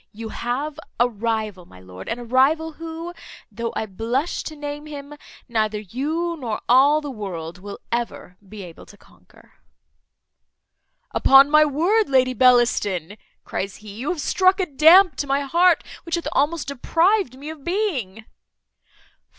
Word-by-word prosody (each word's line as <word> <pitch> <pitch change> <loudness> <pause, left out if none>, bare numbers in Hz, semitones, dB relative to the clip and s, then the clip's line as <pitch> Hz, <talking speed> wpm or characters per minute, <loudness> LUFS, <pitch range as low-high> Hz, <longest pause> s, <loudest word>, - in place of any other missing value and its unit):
You 220 +1 -8
have 280 +7 -4 0.2
a 240 - +5
rival, 215 -5 -3
my 90 - -16
lord, 95 0 -11
and 240 - -3
a - - -7
rival 275 +7 +2
who, 330 +2 -7 0.4
though 230 +2 -4
I - - -2
blush 230 - -2
to 310 - -6
name 295 0 -7
him, 285 -1 -9 0.3
neither 215 -3 -1
you, 300 - -3
nor 230 -5 -3
all 280 +5 +5
the 290 -2 -6
world, 180 -7 -7
will 200 +1 -8
ever 235 -6 -4
be 210 -1 -9
able 170 -2 -12
to - - -16
conquer." - - -23 1.6
"Upon 270 +1 +6
my 305 0 +6
word, 350 +9 +1
Lady 255 -1 +3
Bellaston," 235 -8 +2 0.3
cries 195 +1 -4
he, 210 -2 -11
"you 240 +7 -5
have 355 -5 -2
struck 375 +4 +2
a 375 - +1
damp 320 +2 +6
to 285 - -3
my 275 +1 +1
heart, 340 +5 +3 0.2
which 335 - -3
hath 340 - -4
almost 295 +2 0
deprived 330 - +1
me 290 +3 -7
of 310 -3 -12
being." 270 - -2
270 Hz, 155 wpm, -22 LUFS, 220-315 Hz, 1.6 s, Upon